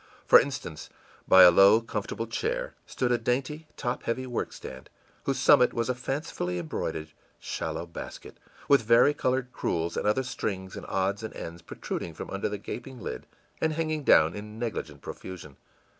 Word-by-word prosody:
For - - +9
instance, 120 - -5 0.4
by 95 0 +9
a 90 - +10
low, 100 +5 +7
comfortable 115 0 -4
chair - - -2
stood 125 -2 -1
a 120 - +2
dainty, 135 +7 -2
top 120 - -2
heavy 130 +3 -2
workstand, 65 - -5 0.4
whose 135 -1 0
summit 130 0 +5
was 115 +1 -1
a - - +2
fancifully 125 - -3
embroidered 80 -1 -4 0.3
shallow - - -4
basket, 85 - -9 0.3
with 140 -2 +6
varicolored 125 +2 +3
crewels, 85 -6 -2
and - - -1
other 110 +6 +2
strings 95 -7 -4
and - - -8
odds 95 +2 0
and 110 - -7
ends 85 +1 -7
protruding 80 0 -6
from - - -7
under - - -2
the - - -3
gaping 130 - -7
lid - - -6 0.3
and 160 0 +1
hanging 155 -1 -2
down 80 - +5
in 105 +1 -8
negligent 85 - -4
profusion. 85 -7 -9
115 Hz, 160 wpm, -28 LUFS, 90-130 Hz, 0.4 s, a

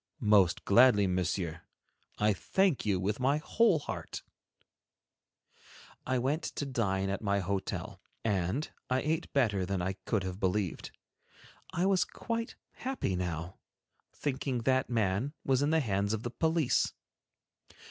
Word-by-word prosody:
"Most 100 -4 +4
gladly, 105 -1 +6
Monsieur. 90 -2 -1 0.6
I 105 0 +3
thank 180 - +1
you 95 -3 +2
with 100 +5 -1
my 135 +3 +2
whole 200 +4 +3
heart." 145 - -6 1.8
I 130 - +1
went 135 +6 0
to 145 - -4
dine 95 -7 0
at 100 - -3
my 100 -2 +1
hotel 100 0 -3 0.2
and 100 - 0 0.2
I 130 0 +2
ate 155 +1 -1
better 110 -9 +2
than 95 +1 -1
I 95 +2 -1
could 105 -4 +1
have 95 0 -5
believed. 95 -2 -1 0.8
I 175 - 0
was 195 -1 +4
quite 230 0 -4 0.2
happy 255 - -2
now, 90 0 -4 0.5
thinking 130 -3 -2
that 130 +1 +2
man 110 +3 0
was 135 -1 +2
in 145 - +2
the 160 0 +3
hands 100 -3 0
of 110 0 -3
the 120 - -3
police. 160 -1 +1
110 Hz, 135 wpm, -31 LUFS, 95-140 Hz, 1.8 s, gladly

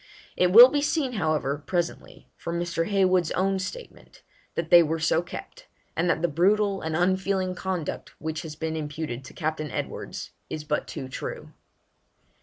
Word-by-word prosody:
It 180 0 +3
will 240 +6 +11
be 290 +1 0
seen, 285 -3 0
however, 155 - 0
presently, 175 +3 -3
from 170 0 -4
Mr. 170 -1 -1
Heywood's 185 -4 +3
own 190 +1 +1
statement, 485 - -8 0.3
that 165 -1 -3
they 175 - +10
were 160 0 0
so 160 +1 +2
kept, - - -10 0.3
and 175 +2 +1
that 165 -1 +1
the - - +4
brutal 195 +5 +2
and 160 0 -3
unfeeling 185 +1 +1
conduct 185 -4 -4
which 160 0 -3
has 155 -2 -8
been 160 0 -3
imputed 150 -4 -4
to - - -12
Captain 155 -2 -2
Edwards - - -5 0.2
is 155 - -5
but 150 0 -2
too 130 - -6
true. 130 - -6
170 Hz, 165 wpm, -26 LUFS, 155-190 Hz, 0.3 s, will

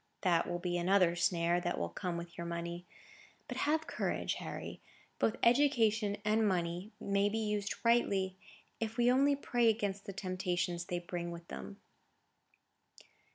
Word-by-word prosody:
That 170 -3 +2
will 175 - -1
be 175 0 -1
another 180 -1 +4
snare 170 0 +2
that 175 0 -1
will 85 - -1
come 170 - -3
with 170 0 -7
your 170 - -5
money. 170 +1 -4 0.6
But - - -5
have 315 +1 +2
courage, - - -1
Harry. - - -6 0.4
Both 225 - +2
education 230 -5 +3
and 215 +1 +3
money 175 +1 -1
may 200 +1 +1
be 220 - -2
used 210 -2 -1
rightly, 200 -5 +3 0.4
if 225 +1 -3
we 240 0 +5
only 280 +2 +4
pray 240 -4 +2
against 205 -3 -1
the - - -5
temptations 180 -2 -2
they 175 - -2
bring 175 0 -4
with 170 0 -8
them." 65 0 -7
190 Hz, 155 wpm, -34 LUFS, 175-220 Hz, 0.6 s, we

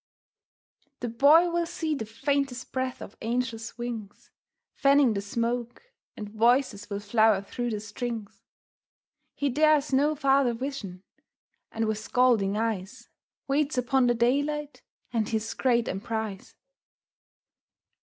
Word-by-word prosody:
The 240 - -2
Boy 300 +9 +5
will 340 0 0
see 330 -2 -2
the 225 -7 -4
faintest 270 +2 -2
breath 260 -1 -3
of 200 - -11
angels' 230 -1 -3
wings 230 -4 -7 0.4
Fanning 275 -3 +4
the 200 - -2
smoke, 235 - -3 0.3
and 210 - -6
voices 220 -1 +1
will 200 -1 -3
flower 215 0 +3
through 240 +4 -4
the 215 -2 -2
strings. 215 0 -6 0.9
He 285 - -1
dares 300 +1 +3
no 290 +3 +3
farther 270 -4 +2
vision, 230 -8 -6 0.7
and 225 0 -1
with 215 -1 -1
scalding 220 -4 +2
eyes 220 +1 -3 0.4
Waits 280 0 0
upon 250 +1 +2
the 240 - +3
daylight 285 +5 0 0.3
and 220 -3 0
his 220 -1 -2
great 240 -3 +1
emprise. 215 -1 -4
240 Hz, 125 wpm, -27 LUFS, 220-275 Hz, 0.9 s, Boy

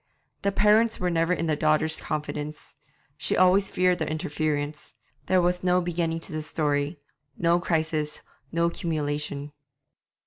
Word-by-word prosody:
The 200 - +1
parents 215 +3 +4
were 180 -1 0
never 165 +1 +1
in 165 -2 0
the 155 -2 +1
daughter's 155 +1 +1
confidence. 150 0 -5 0.4
She - - -1
always 185 +2 +5
feared 180 0 +2
their 160 - -1
interference. 150 -1 -2 0.3
There 185 - +4
was 180 0 +1
no 180 0 +3
beginning 170 -2 -1
to - - -10
the 155 0 -3
story, 150 0 -1 0.4
no 170 +1 +3
crisis, 160 -3 -1 0.3
no 170 0 +1
culmination. 150 -3 -3
165 Hz, 140 wpm, -26 LUFS, 150-180 Hz, 0.4 s, always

